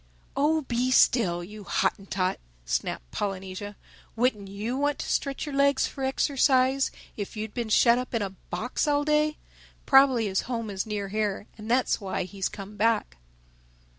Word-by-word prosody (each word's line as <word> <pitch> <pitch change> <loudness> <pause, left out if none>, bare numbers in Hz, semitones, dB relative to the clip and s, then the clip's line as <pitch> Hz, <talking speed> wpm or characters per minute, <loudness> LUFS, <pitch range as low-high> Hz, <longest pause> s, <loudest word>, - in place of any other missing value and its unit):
"Oh, 310 +3 +2
be 250 -2 -1
still, 195 -9 +4
you 210 +3 -10
Hottentot!" 190 -2 -1 0.3
snapped - - -2
Polynesia. 195 +1 -4 0.4
"Wouldn't 225 -4 +1
you 210 +5 -4
want 290 +1 0
to - - -4
stretch 275 +1 -1
your 295 - -6
legs 280 0 +3
for 270 - -6
exercise 265 0 +2 0.3
if 205 +1 -5
you'd 215 -1 -4
been 235 -3 -3
shut 235 +2 +5
up 250 -1 -5
in 225 - +1
a 195 - -3
box 235 +8 -3
all 290 0 +2
day. 300 0 +2 0.5
Probably 270 -4 +5
his 195 -2 0
home 230 -4 -2
is 195 +2 -3
near 205 -2 -3
here, 210 -1 -1
and 215 0 -9
that's 250 -1 +2
why 190 -1 -2
he's 190 +1 -3
come 205 +1 -9
back." 210 - +1
225 Hz, 165 wpm, -27 LUFS, 200-265 Hz, 0.5 s, shut